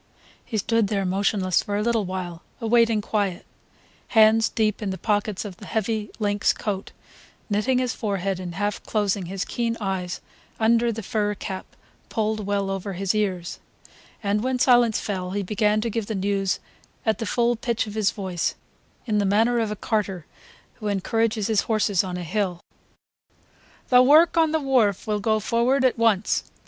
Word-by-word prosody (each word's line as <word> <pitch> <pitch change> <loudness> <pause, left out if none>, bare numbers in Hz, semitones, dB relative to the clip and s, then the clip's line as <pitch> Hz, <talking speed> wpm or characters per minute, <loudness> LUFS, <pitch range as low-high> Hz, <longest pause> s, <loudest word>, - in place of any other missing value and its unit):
He 220 - -4
stood 225 +1 +1
there 195 -1 -1
motionless 190 0 +1
for 205 0 -3
a 210 - 0
little 230 -2 +1
while, 180 -2 -5 0.2
awaiting 230 -1 +3
quiet, 200 -4 -2 0.6
hands 220 0 +5
deep 215 -2 0
in 205 - -2
the 190 - -3
pockets 210 -1 -1
of 190 -3 -7
the 205 - -11
heavy 220 -1 -1
lynx 205 -2 +1
coat, 200 -2 -4 0.6
knitting 215 +6 +2
his 250 -2 0
forehead 195 -3 -2
and 175 -2 -6
half 205 +2 -2
closing 200 -4 -1
his 195 +1 -3
keen 230 -1 -2
eyes 190 -4 -3 0.4
under 230 +1 +3
the 225 0 -5
fur 210 +1 -1
cap 190 0 -6 0.4
pulled 215 -2 -1
well 200 -1 0
over 195 +1 -4
his 190 +2 -1
ears; 190 -5 -2 0.6
and 205 +1 0
when 260 0 0
silence 240 -3 +4
fell 185 -3 -3
he 200 0 -1
began 210 +2 +1
to 230 - -1
give 225 -1 -2
the 220 - -3
news 195 0 0 0.5
at 220 0 +1
the 225 - -3
full 240 +2 +2
pitch 235 0 -1
of 210 - -8
his 215 -2 +2
voice, 185 -5 -2 0.5
in 215 -3 +1
the - - +2
manner 225 +5 +3
of 225 -2 0
a 210 - -3
carter 195 -5 -2 0.5
who 215 - -4
encourages 215 +2 0
his 215 -1 +2
horses 210 -4 +1
on 180 -1 -4
a 180 - -4
hill. 180 0 -1 1.3
"The 250 -1 +7
work 310 +7 +6
on 325 -2 +3
the 320 - +1
wharf 250 -9 +2
will 210 -1 -1
go 215 +1 +1
forward 240 +5 +2
at 250 -2 +2
once 220 -3 +2
210 Hz, 175 wpm, -24 LUFS, 195-225 Hz, 1.3 s, The